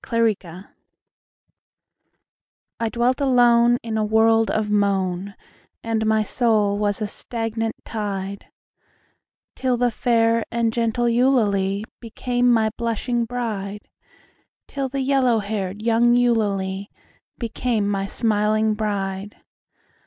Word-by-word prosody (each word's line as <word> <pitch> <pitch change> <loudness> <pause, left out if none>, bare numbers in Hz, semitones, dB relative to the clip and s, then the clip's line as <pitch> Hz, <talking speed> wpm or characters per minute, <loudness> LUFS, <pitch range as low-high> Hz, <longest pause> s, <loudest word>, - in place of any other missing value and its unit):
2 230 - -3
Autoplay 195 -5 -1 2.1
I 230 -1 0
dwelt 245 +4 0
alone 240 -2 +4
In 220 -1 -2
a - - +1
world 225 +1 +3
of 215 -1 0
moan, 200 -2 0 0.5
And 225 -1 -1
my 220 0 +3
soul 210 -3 +1
was 205 +1 -1
a - - 0
stagnant 225 +1 -4
tide, 200 -2 -4 1.1
Till 255 -2 0
the 245 0 +1
fair 230 0 +2
and 230 -1 0
gentle 235 +1 0
Eulalie 215 -5 +2
became 245 +1 0
my 220 -2 +2
blushing 235 +1 -1
bride 210 -4 -4 0.8
Till 275 -1 -3
the 275 +1 -3
yellow 260 -3 +2
haired 205 -1 -4
young 235 +1 +3
Eulalie 200 -5 0 0.5
became 230 -2 -1
my 195 -1 -1
smiling 215 0 +1
bride. 205 -2 -3
225 Hz, 110 wpm, -22 LUFS, 205-235 Hz, 2.1 s, alone